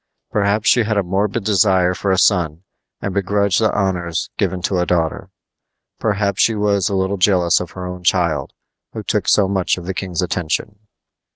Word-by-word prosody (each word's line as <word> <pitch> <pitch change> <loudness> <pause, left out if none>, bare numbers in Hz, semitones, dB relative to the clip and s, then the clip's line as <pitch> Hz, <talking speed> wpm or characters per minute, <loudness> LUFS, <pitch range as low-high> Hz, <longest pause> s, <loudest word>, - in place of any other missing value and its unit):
Perhaps 105 +1 0
she 120 - +5
had 110 -1 -1
a 100 - +2
morbid 100 +4 -1
desire 95 -3 +3
for 100 - -3
a 95 - +2
son 85 -4 +2 0.4
and 95 - -3
begrudged 100 +1 +1
the 110 - +2
honors 90 -4 -2
given 95 - -1
to 95 -2 0
a 90 - +1
daughter. 85 -2 -1 0.7
Perhaps 100 -3 0
she 115 - +3
was 105 -2 +1
a 100 - -1
little 95 +1 0
jealous 90 -2 +3
of 90 -1 -7
her 90 -1 -6
own 90 0 -7
child, 85 -6 +1 0.4
who - - -6
took - - -1
so 100 -2 +4
much 95 -2 0
of 90 - -8
the 95 - -3
king's 90 -2 -3
attention. 90 +4 -3
95 Hz, 185 wpm, -19 LUFS, 90-100 Hz, 0.7 s, she